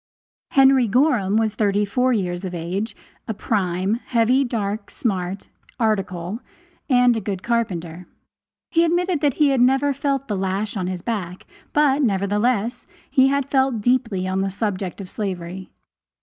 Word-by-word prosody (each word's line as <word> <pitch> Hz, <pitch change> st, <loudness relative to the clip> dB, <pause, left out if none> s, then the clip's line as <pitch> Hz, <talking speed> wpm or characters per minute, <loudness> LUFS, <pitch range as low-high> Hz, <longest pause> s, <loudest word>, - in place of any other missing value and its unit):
Henry 270 Hz, -2 st, +5 dB
Gorham 225 Hz, -4 st, +2 dB
was 220 Hz, -1 st, +1 dB
thirty 205 Hz, -1 st, +1 dB
four 250 Hz, +5 st, +1 dB
years 180 Hz, -5 st, -1 dB
of 180 Hz, -1 st, -4 dB
age, 190 Hz, +6 st, -3 dB, 0.3 s
a 220 Hz, -, -3 dB
"prime," 190 Hz, -2 st, 0 dB
heavy, 245 Hz, +3 st, +3 dB
dark, 210 Hz, -4 st, -3 dB
smart, 190 Hz, -4 st, -3 dB, 0.3 s
"article," 195 Hz, -3 st, -1 dB, 0.5 s
and 245 Hz, -2 st, +5 dB
a 225 Hz, -, -2 dB
good 195 Hz, -1 st, -4 dB
carpenter. 180 Hz, -8 st, -2 dB, 0.6 s
He 335 Hz, -1 st, +4 dB
admitted 350 Hz, -1 st, +1 dB
that 285 Hz, -4 st, +2 dB
he 295 Hz, -2 st, +4 dB
had 270 Hz, -3 st, +2 dB
never 270 Hz, +3 st, +3 dB
felt 275 Hz, 0 st, -1 dB
the 210 Hz, -, -2 dB
lash 195 Hz, +3 st, -2 dB
on 185 Hz, -3 st, -2 dB
his 180 Hz, -1 st, -4 dB
back, 185 Hz, -6 st, -4 dB, 0.3 s
but, 295 Hz, -1 st, +3 dB
nevertheless, 210 Hz, +2 st, 0 dB, 0.2 s
he 265 Hz, -1 st, +5 dB
had 280 Hz, 0 st, 0 dB
felt 265 Hz, -5 st, +2 dB
deeply 225 Hz, -6 st, +1 dB
on 190 Hz, +1 st, 0 dB
the 195 Hz, -, 0 dB
subject 195 Hz, -2 st, -3 dB
of 190 Hz, -, -8 dB
slavery. 185 Hz, -2 st, -5 dB
215 Hz, 150 wpm, -22 LUFS, 190-255 Hz, 0.6 s, Henry